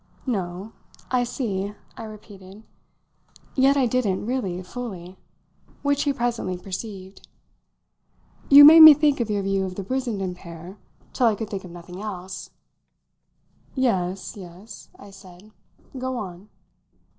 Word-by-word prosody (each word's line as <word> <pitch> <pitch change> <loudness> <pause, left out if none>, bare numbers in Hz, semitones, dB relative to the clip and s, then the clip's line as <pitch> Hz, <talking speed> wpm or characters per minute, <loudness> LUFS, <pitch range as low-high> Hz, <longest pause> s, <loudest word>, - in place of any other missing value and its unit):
"No. 195 -3 -4 0.4
I 250 -1 +2
see," 205 -5 -4 0.2
I 225 - -8
repeated. 205 -1 -13 0.9
Yet 275 +1 +3
I 265 - +3
didn't, 225 -6 -1
really, 200 -8 -3
fully; 185 -4 -8 0.7
which 285 0 +1
he 285 - +2
presently 235 -8 -2
perceived. 190 +1 -8 1.2
"You 285 +1 +10
made 320 +2 +10
me 315 -2 +12
think 295 -1 +1
of 235 -2 -2
your 205 -1 -1
view 195 0 0
of 185 -1 -5
the 195 - -5
Brissenden 215 -6 -3
pair 175 +2 -11 0.3
till 250 - +2
I 220 - +2
could 220 0 -6
think 195 -2 -5
of - - -10
nothing 175 +2 -10
else." 190 -3 -7 1.3
"Yes 195 -7 -1
yes," 190 +2 -12
I 200 - -14
said. 190 +1 -16 0.4
"Go 260 0 -4
on." 190 -1 -8
205 Hz, 135 wpm, -23 LUFS, 185-245 Hz, 1.3 s, me